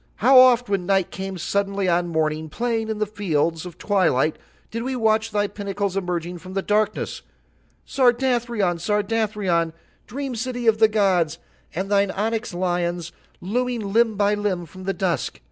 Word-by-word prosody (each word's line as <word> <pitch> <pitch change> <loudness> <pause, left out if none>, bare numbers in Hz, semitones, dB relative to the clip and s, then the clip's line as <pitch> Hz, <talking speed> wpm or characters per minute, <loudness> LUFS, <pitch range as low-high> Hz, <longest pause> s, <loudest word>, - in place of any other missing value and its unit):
"How 255 +4 +6
oft 250 -1 +6
when 195 -3 -1
Night 195 -2 +2
came 190 -1 -5
suddenly 200 +2 -1
on 175 0 +2
Morning 155 -1 -1
playing 225 +4 -2
in 220 - -2
the 215 - 0
fields 170 -5 -1
of 175 - -11
Twilight 180 -8 +1 0.3
did 230 - -3
we 260 +2 -2
watch 220 -1 +2
thy 205 -1 0
pinnacles 200 -1 -3
emerging 175 -2 -3
from 185 +3 -10
the 195 - 0
darkness, 210 0 0 0.6
Sardathrion, 240 -7 +1
Sardathrion, 205 -4 0 0.3
dream 270 +1 -4
city 245 +1 -3
of 220 -1 +4
the 220 - +7
gods, 185 -7 +1 0.4
and 190 +3 -3
thine 200 -1 +3
onyx 220 +4 -2
lions 175 -1 -2 0.3
looming 230 0 -2
limb 230 -1 +3
by 205 0 +3
limb 205 -4 -1
from 185 +4 -12
the 195 - 0
dusk. 180 - -2
200 Hz, 160 wpm, -23 LUFS, 180-225 Hz, 0.6 s, the